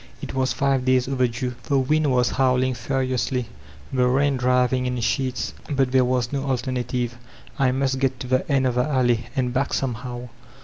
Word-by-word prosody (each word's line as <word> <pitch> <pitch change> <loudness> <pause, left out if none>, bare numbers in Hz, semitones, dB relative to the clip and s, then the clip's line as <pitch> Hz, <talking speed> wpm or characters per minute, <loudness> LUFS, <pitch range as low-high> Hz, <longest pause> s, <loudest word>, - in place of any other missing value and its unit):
It - - -6
was 130 -1 +1
five 135 +1 +1
days 130 0 +2
overdue. 125 -1 -1
The 140 -3 +1
wind 150 +2 +2
was 125 -1 +2
howling 130 0 +2
furiously, 130 -2 -1 0.4
the 125 -1 +3
rain 140 +2 +2
driviqg 125 0 +2
in 125 -1 -2
sheets, 130 +2 -1 0.2
but 135 -3 +1
there 130 -1 +4
was 125 -1 0
no 140 -1 -1
alternative; 125 -2 -2 0.4
I 130 -2 +3
must 135 0 0
get 130 -1 0
to - - -4
the 130 +1 +3
''End 135 -2 +2
of 125 - 0
the 125 +1 +1
Alley" 120 -4 +1
and 125 -2 0
back, 135 +2 0
somehow. 125 -1 -4
130 Hz, 180 wpm, -23 LUFS, 125-135 Hz, 0.4 s, there